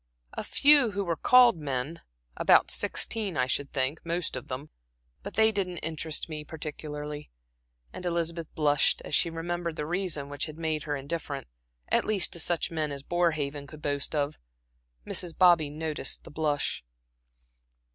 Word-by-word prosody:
"A - - -4
few 280 -6 +5
who 200 0 -1
were 170 -3 -1
called 245 +2 +6
men 145 +1 -3 0.3
about - - +5
sixteen, 205 -7 -1
I 125 - +3
should 140 +2 -1
think 135 +3 -1
most 170 -2 -1
of 130 - -6
them 135 +4 -6 0.5
but - - -8
they 220 +1 +6
didn't 185 -4 -2
interest 160 -1 -2
me 155 -2 -6
particularly." 150 -1 -6 0.6
And - - -8
Elizabeth 170 -2 -2
blushed, 145 -2 +2
as - - -8
she 170 - +3
remembered 170 0 -3
the 150 - -3
reason 170 -4 -2
which 145 +2 -2
had 155 0 -9
made 160 -2 -2
her 145 -1 -1
indifferent, 140 0 -4 0.4
at - - +3
least 200 -5 +1
to 170 - -2
such 170 0 +1
men 155 -2 -1
as 140 -1 -6
Borehaven 150 -4 0
could 155 +2 -12
boast 145 +1 -1
of. 145 0 -1 0.7
Mrs. 170 -2 0
Bobby 175 -5 +5
noticed 155 -2 -2
the - - -12
blush. 150 - -1
155 Hz, 160 wpm, -28 LUFS, 145-175 Hz, 0.7 s, called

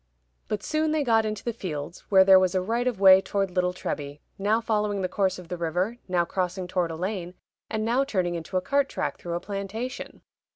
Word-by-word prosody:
But 210 -1 -3
soon 310 0 0
they 305 -1 +1
got 225 -3 +3
into 215 -1 -4
the 235 - -2
fields, 165 -5 -5
where 190 -2 +7
there 190 0 +8
was 185 -1 +1
a 185 - +2
right 235 +5 0
of 240 -6 -1
way 190 -1 +8
toward 195 -1 -1
Little 180 0 +1
Treby, 145 -5 -5 0.2
now 210 +3 +2
following 210 -3 -1
the - - +1
course 190 -1 0
of 180 -2 -11
the 180 - -4
river, 180 +8 -1
now 175 -2 +1
crossing 180 +1 -2
toward 180 -2 0
a 165 - -5
lane, 180 0 -4 0.3
and 220 -1 -2
now 245 +4 +2
turning 185 -10 -1
into 170 +2 -3
a - - +1
cart 280 +7 +1
track - - -3
through 170 -1 -4
a - - -1
plantation. 205 +7 -6
190 Hz, 220 wpm, -26 LUFS, 180-220 Hz, 0.3 s, there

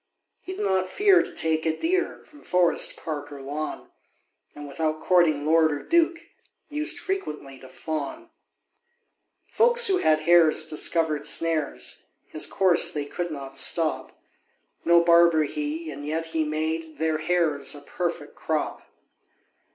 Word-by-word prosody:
He 375 - -7
did 210 - -3
not 190 -1 0
fear 390 - +4
to - - -7
take 160 0 -1
a 160 -1 -1
deer 370 +3 -1
From 295 -1 -18
forest, 180 -2 +1
park, 145 -2 -6
or 140 - -9
lawn; 145 +3 -6 0.6
And 145 0 -9
without 155 +2 -2
courting 160 -5 +2
lord 160 0 +4
or 145 -1 -4
duke, 340 0 +2 0.5
Used 300 +1 -1
frequently 150 - -5
to 130 - -14
fawn. 160 - -6 1.2
Folks 480 0 +4
who 385 -3 +3
had 155 - +2
hares 160 -1 +4
discovered 155 -1 0
snares 155 -1 -2 0.2
His 155 - -2
course 185 -3 +2
they 145 -1 -3
could 175 +4 -4
not 135 -3 -6
stop: 165 -2 -1 0.6
No 170 0 +5
barber 170 -2 +5
he, 150 +2 -4
and 145 0 -8
yet 160 +2 -3
he 160 -1 -1
made 160 +1 -3
Their 160 -1 0
hares 155 -4 0
a 145 - -9
perfect 170 -1 -4
crop. 155 -1 -3
160 Hz, 145 wpm, -25 LUFS, 150-175 Hz, 1.2 s, No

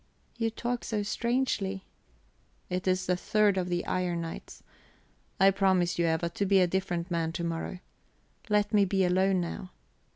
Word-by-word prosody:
"You 225 -1 0
talk 240 +2 -3
so 210 -2 -2
strangely." 215 -4 -1 0.9
"It 180 +1 -2
is 185 0 +1
the 180 - +2
third 210 +2 +2
of 180 -1 -1
the 175 0 -1
iron 175 -2 -1
nights. 165 -1 -8 0.8
I 195 0 +7
promise 190 -3 +2
you, 170 - +3
Eva, 160 +1 +1
to 200 +4 -2
be 195 0 +5
a 185 - +5
different 180 -1 -2
man 165 -1 0
to 170 - -3
morrow. 165 +2 -3 0.7
Let 210 0 +2
me 205 -1 +5
be 195 0 +1
alone 185 +1 +2
now. 180 +2 -5
190 Hz, 165 wpm, -29 LUFS, 175-205 Hz, 0.9 s, I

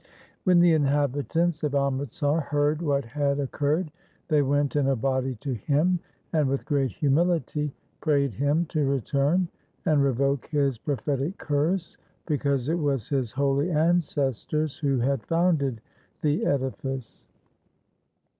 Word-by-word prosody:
When 180 -2 +5
the 175 -1 +6
inhabitants 145 +3 +1
of 145 -1 0
Amritsar 140 +2 0
heard 145 +1 0
what 140 -5 0
had 140 +3 -1
occurred, 145 +4 -1 0.4
they 150 -2 +4
went 145 +1 +1
in 145 -2 +2
a 135 - +3
body 130 +1 -1
to 135 -2 -2
him, 150 - +1 0.3
and 150 -4 +2
with 135 0 -2
great 140 -3 +1
humility 150 0 0 0.3
prayed 140 -5 +1
him 145 - +1
to 155 - 0
return 140 +6 +1 0.4
and 150 -3 +3
revoke 140 0 +1
his 140 -5 0
prophetic 140 - -2
curse, 160 +5 -1 0.3
because 140 -4 0
it 165 +3 0
was 140 -7 -1
his 130 -5 -1
holy 140 +4 +1
ancestors 155 -3 0
who 140 -3 0
had 130 +1 0
founded 160 -9 +1 0.4
the 150 0 +1
edifice. 135 -2 -3
145 Hz, 130 wpm, -26 LUFS, 135-155 Hz, 0.4 s, the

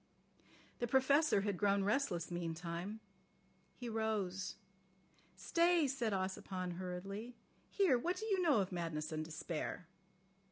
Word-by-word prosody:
The 240 - 0
Professor 265 -1 +4
had 200 -2 -1
grown 200 -1 +3
restless 200 -6 0
meantime. 175 +4 -4 0.7
He 245 - -6
rose. 210 -4 -1 0.8
"Stay," 340 -2 +3
said 255 -4 0
Ossipon 185 -2 -2
hurriedly. 195 +6 -5 0.3
"Here, 350 -12 +4
what 350 +8 -1
do 440 - -4
you 395 -4 +2
know 300 - +4
of 190 - -3
madness 165 -3 -3
and 155 0 -2
despair?" 160 +2 -4
200 Hz, 120 wpm, -37 LUFS, 180-260 Hz, 0.8 s, Professor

